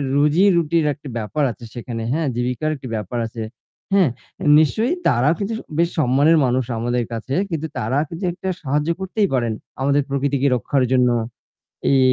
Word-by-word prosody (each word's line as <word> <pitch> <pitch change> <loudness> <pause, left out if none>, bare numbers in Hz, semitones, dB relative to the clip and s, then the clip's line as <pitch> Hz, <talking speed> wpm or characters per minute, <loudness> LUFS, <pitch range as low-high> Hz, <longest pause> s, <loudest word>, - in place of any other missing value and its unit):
রুজি-রুটির 165 +1 +3
একটা 145 0 -12
ব্যাপার 115 +7 -2
আছে 120 - -12
সেখানে, 115 -2 -5
হ্যাঁ? 160 -1 0
জীবিকার 125 +5 -1
একটি 130 -2 -9
ব্যাপার 105 +3 -4
আছে। 115 0 -7 0.5
হ্যাঁ? 185 -8 +5 0.5
নিশ্চয়ই 225 - +2
তারাও 130 +7 +3
কিন্তু 205 +3 -2 0.2
বেশ 170 0 +3
সম্মানের 145 +5 +4
মানুষ 125 0 +1
আমাদের 120 +1 0
কাছে 115 +4 -4 0.2
কিন্তু 160 -1 -2
তারা 125 +3 -1
কিন্তু 170 +3 -7
একটা 190 +1 -4
সাহায্য 150 +2 0
করতেই 195 +2 0
পারেন 120 -3 +1 0.3
আমাদের 140 +1 +3
প্রকৃতিকে 140 0 +1
রক্ষার 130 +2 0
জন্য। 125 -1 +4 0.8
এই, 135 - +5
140 Hz, 155 wpm, -21 LUFS, 125-165 Hz, 0.8 s, হ্যাঁ